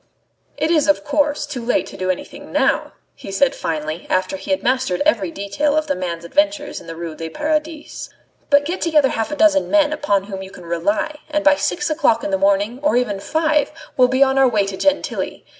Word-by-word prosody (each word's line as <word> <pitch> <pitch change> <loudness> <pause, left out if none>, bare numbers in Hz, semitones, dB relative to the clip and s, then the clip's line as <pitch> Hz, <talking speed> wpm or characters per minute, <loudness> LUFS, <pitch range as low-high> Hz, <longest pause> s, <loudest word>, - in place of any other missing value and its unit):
"It 315 - 0
is, 310 -3 +3
of 295 - +2
course, 295 0 0
too 275 -5 -6
late 240 - +1
to - - -11
do 185 0 -3
anything 185 - -5
now," - - +1 0.2
he 195 - -10
said 260 +8 +2
finally, 155 +1 -4
after 185 +1 0
he 190 0 -9
had 190 - 0
mastered 255 -5 +1
every 200 - +2
detail 200 - -1
of 310 - +1
the 290 - 0
man's 170 -2 -4
adventures 295 - 0
in - - -15
the 165 - -7
Ruelle 165 -1 -6
du 165 0 -6
Paradis; 305 - -3 0.4
"but 285 0 +4
get 350 +5 -3
together 305 -5 +3
half 225 -3 -2
a 300 - -3
dozen 300 -2 +3
men 305 -1 +3
upon 205 -10 0
whom 195 -1 -7
you 190 - -8
can 180 -2 -13
rely, 200 - -1
and 300 0 -1
by 295 -1 +6
six 350 +2 -1
o'clock 265 -7 +2
in - - -2
the 190 - +1
morning, 200 +5 +1
or 295 -4 +2
even 210 -6 0
five, 310 +6 +1 0.2
we'll 250 -1 +5
be 260 +2 +4
on 270 0 +2
our 265 -1 +5
way 210 -4 +1
to 195 -1 -5
Gentilly. 290 +8 -1
260 Hz, 220 wpm, -20 LUFS, 195-300 Hz, 0.4 s, by